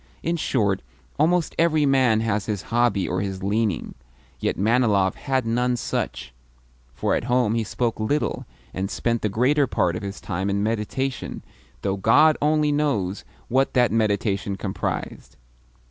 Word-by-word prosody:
In 170 +1 0
short, 105 - 0 0.4
almost 170 +2 +2
every 160 -3 +3
man 130 -5 +3
has 105 -2 -1
his 105 -3 -2
hobby 120 -5 +2
or 90 +1 -1
his 95 -1 -4
leaning; 105 -2 -1 0.5
yet - - -1
Manilov 105 -3 +2
had 130 -2 -1
none 125 +2 +1
such, 70 - -3 0.6
for - - 0
at - - -1
home 120 -3 +2
he 115 -1 0
spoke 115 +1 -2
little, 145 +8 -1 0.3
and 95 +1 -3
spent 115 +1 -1
the 105 - 0
greater 130 +7 +2
part 90 -6 0
of - - -4
his 100 0 -6
time 95 0 -3
in 100 +1 0
meditation 115 +5 -3 0.4
though 100 0 0
God 145 +10 +5
only 150 0 +2
knows 115 -11 0 0.2
what 135 +3 +1
that 125 -2 +4
meditation 100 -3 0
comprised! 95 0 -4
115 Hz, 150 wpm, -23 LUFS, 100-130 Hz, 0.6 s, God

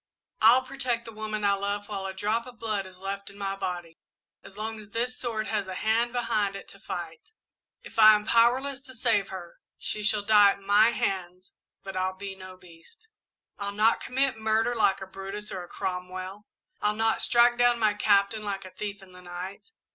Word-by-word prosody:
I'll 235 +4 +7
protect 255 -3 -2
the 225 - -8
woman 215 -1 -4
I 200 0 +4
love 200 +1 -2
while 195 -2 -4
a 190 - -5
drop 215 +5 -1
of 245 -2 -12
blood 210 -4 -2
is 185 -1 -14
left 195 +1 -5
in 200 - -14
my 195 -1 -2
body 175 -4 -5 0.4
as 195 - -13
long 220 +1 -4
as 210 -1 -12
this 240 +3 -2
sword 225 -4 -3
has 210 -3 -2
a 185 - -5
hand 230 +4 +1
behind 215 -5 0
it 195 - -8
to - - -14
fight. 485 - -7 0.5
If 355 - -7
I 215 0 +10
am 210 0 -2
powerless 255 +5 +3
to 260 -1 -11
save 225 -4 +2
her, 180 -3 -9 0.2
she 210 - -3
shall 210 0 +2
die 205 -1 +6
at - - -14
my 205 +3 +5
hands, 185 -4 -3 0.3
but 195 -1 -7
I'll 185 0 -1
be 195 0 -6
no 185 -1 -11
beast! 180 - -18 0.5
"I'll 200 0 -3
not 215 +3 +3
commit 265 -2 0
murder 220 +2 +1
like 220 -5 +2
a - - -4
Brutus 195 +2 -7
or 185 -2 -5
a - - -11
Cromwell. 185 +2 -5 0.3
I'll 210 0 +1
not 225 0 +1
strike 240 0 +4
down 245 0 +4
my 215 -2 +2
Captain 205 0 +2
like 200 -2 -4
a 185 - -10
thief 200 0 -6
in 185 - -16
the 180 0 -14
night! 180 - -8
210 Hz, 205 wpm, -27 LUFS, 195-225 Hz, 0.5 s, I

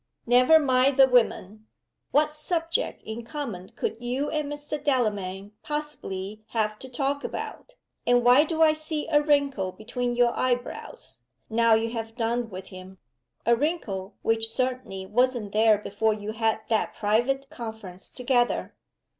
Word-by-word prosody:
"Never 250 +6 +6
mind 265 -2 +3
the 270 -1 +8
women! 220 -4 +1 0.4
What 300 +1 +3
subject 330 +7 -2
in 220 +2 -6
common 230 -8 -6
could 225 - -2
you 250 +4 -2
and 300 -2 -2
Mr. 290 0 -5
Delamayn 205 -8 -1
possibly 215 -9 -5
have 215 -2 0
to 260 - -8
talk 275 +3 -1
about? - - -6 0.3
And 245 0 +4
why 250 +4 +7
do 320 0 +1
I 310 -1 +6
see 310 0 -4
a 295 -2 +4
wrinkle 280 -10 +1
between 240 +5 -3
your 240 -1 +3
eyebrows, 255 - -3 0.3
now 230 0 +4
you 225 +1 0
have 225 -1 -5
done 235 0 -1
with 190 -1 -8
him? 185 +1 -11 0.5
a 235 +2 +5
wrinkle 230 - -3
which 225 0 +1
certainly 250 -6 -3
wasn't 240 0 +1
there 215 0 +4
before 210 +1 0
you 210 0 -5
had 220 0 0
that 220 -1 0
private 240 +6 0
conference 220 -6 -8
together?" 245 -1 0
240 Hz, 145 wpm, -26 LUFS, 215-280 Hz, 0.5 s, the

